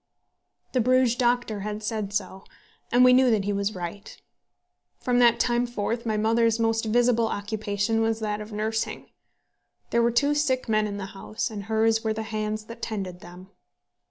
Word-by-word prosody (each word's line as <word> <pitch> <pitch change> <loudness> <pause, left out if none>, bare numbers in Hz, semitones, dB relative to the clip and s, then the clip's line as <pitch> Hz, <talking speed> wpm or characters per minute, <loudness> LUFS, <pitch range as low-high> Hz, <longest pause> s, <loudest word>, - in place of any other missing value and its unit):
The 255 - +2
Bruges 255 0 +3
doctor 240 -3 0
had 210 +1 -5
said 210 -2 -3
so, 190 -2 -3 0.5
and 245 +1 +6
we 250 - +7
knew 255 0 +5
that 215 -4 +1
he 205 - 0
was 200 +1 -1
right. 185 +4 -7 0.8
From 245 -1 +1
that 235 -1 +5
time 240 0 +1
forth 235 +1 -3
my 215 -1 0
mother's 230 +1 +2
most 225 0 +1
visible 235 0 +2
occupation 205 +1 -1
was 225 0 0
that 210 -1 -2
of 210 +1 -9
nursing. 220 +1 -3 0.8
There 235 - +3
were 235 - +3
two 285 +5 +2
sick 275 -4 0
men 215 -1 +2
in 200 -1 -5
the 195 - -5
house, 215 +4 -4
and 205 -2 -6
hers 225 +1 +2
were 220 -1 0
the 220 0 -4
hands 215 0 -3
that 230 - -11
tended 190 -5 -4
them. 180 +2 -13
220 Hz, 180 wpm, -25 LUFS, 210-235 Hz, 0.8 s, we